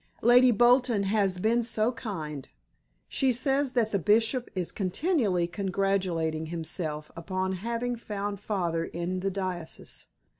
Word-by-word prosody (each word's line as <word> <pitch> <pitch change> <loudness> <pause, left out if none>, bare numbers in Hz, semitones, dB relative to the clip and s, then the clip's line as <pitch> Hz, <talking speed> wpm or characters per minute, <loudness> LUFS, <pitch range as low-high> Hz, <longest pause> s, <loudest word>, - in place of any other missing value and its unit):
Lady 245 +2 +7
Bolton 240 -1 +4
has 195 -2 +1
been 225 +5 +2
so 225 0 +1
kind. 160 - -6 0.6
She 265 -2 +1
says 270 +2 +1
that 225 -3 +1
the 200 - +1
Bishop 225 - +2
is 180 -2 -1
continually 200 - +1
congratulating 180 -4 -1
himself 160 -2 -4
upon 185 +2 -2
having 235 +6 -2
found 205 -3 -4
father 175 -5 -1
in 175 +2 -3
the 195 +1 -1
diocese. 185 -4 -5
200 Hz, 125 wpm, -28 LUFS, 175-235 Hz, 0.6 s, Lady